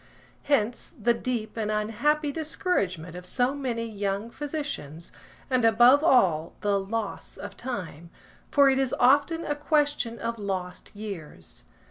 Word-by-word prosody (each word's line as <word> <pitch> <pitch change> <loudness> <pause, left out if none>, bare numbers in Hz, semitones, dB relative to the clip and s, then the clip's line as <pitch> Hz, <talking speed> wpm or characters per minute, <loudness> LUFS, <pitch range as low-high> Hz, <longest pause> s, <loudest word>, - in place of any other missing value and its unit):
Hence 240 -5 0
the 235 +2 +3
deep 230 -2 -3
and 215 -2 -1
unhappy 285 +8 +1
discouragement 200 - -2
of 180 - -7
so 245 +8 0
many 245 -5 -3
young 205 +1 -3
physicians, 280 - -5 0.4
and, 255 -2 +1
above 240 +6 +6
all, 180 - +3
the 205 -1 +2
loss 205 +2 -4
of - - -8
time; 180 - -6 0.4
for 280 -1 +5
it 265 0 +3
is 265 -2 +1
often 285 +6 +4
a 295 - 0
question 290 -5 0
of 230 -1 -4
lost 185 -3 -4
years. 170 - -8
230 Hz, 135 wpm, -27 LUFS, 200-280 Hz, 0.4 s, above